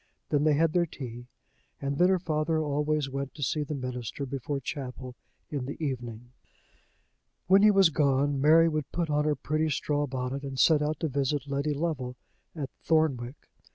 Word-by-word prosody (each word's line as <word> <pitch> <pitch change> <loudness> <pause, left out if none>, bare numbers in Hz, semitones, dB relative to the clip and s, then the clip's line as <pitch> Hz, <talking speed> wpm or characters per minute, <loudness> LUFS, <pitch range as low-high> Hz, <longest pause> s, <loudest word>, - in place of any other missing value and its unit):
Then 145 0 +2
they 155 -1 +4
had 160 +1 +2
their 175 -1 +2
tea, 120 -5 -8 0.5
and 140 0 -3
then 180 +1 +5
her 190 - +4
father 160 -2 0
always 150 -1 0
went 135 0 -5
to 150 - -5
see 150 +4 0
the 150 +1 -3
minister 125 0 -4
before 135 +1 -3
chapel 130 -1 -6 0.4
in 135 -4 -3
the 145 - -5
evening. 120 -5 -5 1.1
When 190 +2 +6
he 215 - +7
was 195 -5 +5
gone, 140 -1 +2
Mary 160 +3 +6
would 155 -3 -2
put 170 -3 -1
on 150 0 +2
her 150 -1 +2
pretty 155 +3 -1
straw 145 0 0
bonnet, 130 +1 -3
and 135 -1 -6
set 155 -2 +5
out 150 0 -1
to 160 - +1
visit 140 0 -1
Letty 140 +2 -1
Lovel 140 -5 -2 0.4
at 140 -4 -5
Thornwick. 145 -5 0
145 Hz, 180 wpm, -28 LUFS, 135-155 Hz, 1.1 s, he